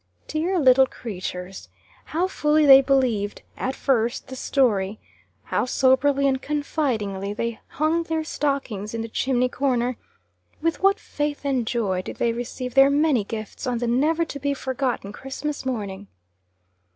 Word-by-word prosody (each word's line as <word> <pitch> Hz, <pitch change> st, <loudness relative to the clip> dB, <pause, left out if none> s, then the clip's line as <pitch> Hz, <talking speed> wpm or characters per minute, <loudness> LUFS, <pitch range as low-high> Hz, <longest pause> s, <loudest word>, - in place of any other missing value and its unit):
Dear 340 Hz, +5 st, -1 dB
little 265 Hz, -3 st, +6 dB
creatures! 185 Hz, -5 st, -7 dB, 0.4 s
how 340 Hz, +4 st, 0 dB
fully 300 Hz, -4 st, +2 dB
they 270 Hz, -1 st, +9 dB
believed, 255 Hz, -7 st, 0 dB
at 260 Hz, +1 st, -3 dB
first, 240 Hz, -3 st, 0 dB
the 260 Hz, -, -6 dB
story; 215 Hz, -7 st, +1 dB, 0.4 s
how -, -, -1 dB
soberly 270 Hz, +2 st, +3 dB
and 265 Hz, -1 st, 0 dB
confidingly 230 Hz, -10 st, -2 dB
they 230 Hz, 0 st, -3 dB
hung 315 Hz, +3 st, 0 dB
their 325 Hz, -1 st, -2 dB
stockings 265 Hz, -9 st, -2 dB
in 225 Hz, -, -2 dB
the -, -, -5 dB
chimney 250 Hz, +2 st, +1 dB
corner; 250 Hz, -2 st, 0 dB, 0.6 s
with 330 Hz, +1 st, -1 dB
what 395 Hz, +1 st, +4 dB
faith 290 Hz, -1 st, -3 dB
and 260 Hz, -5 st, 0 dB
joy 205 Hz, -7 st, 0 dB
did -, -, -7 dB
they 235 Hz, -1 st, 0 dB
receive 245 Hz, +1 st, -5 dB
their 270 Hz, +1 st, +7 dB
many 285 Hz, -5 st, +3 dB
gifts 215 Hz, +3 st, -6 dB
on 245 Hz, -1 st, 0 dB
the 240 Hz, -, -2 dB
never 300 Hz, +8 st, +2 dB
to 285 Hz, -, -7 dB
be 280 Hz, +1 st, -1 dB
forgotten 260 Hz, -6 st, -2 dB
Christmas 270 Hz, +4 st, -5 dB
morning! 205 Hz, -5 st, -4 dB
260 Hz, 150 wpm, -24 LUFS, 230-285 Hz, 0.6 s, they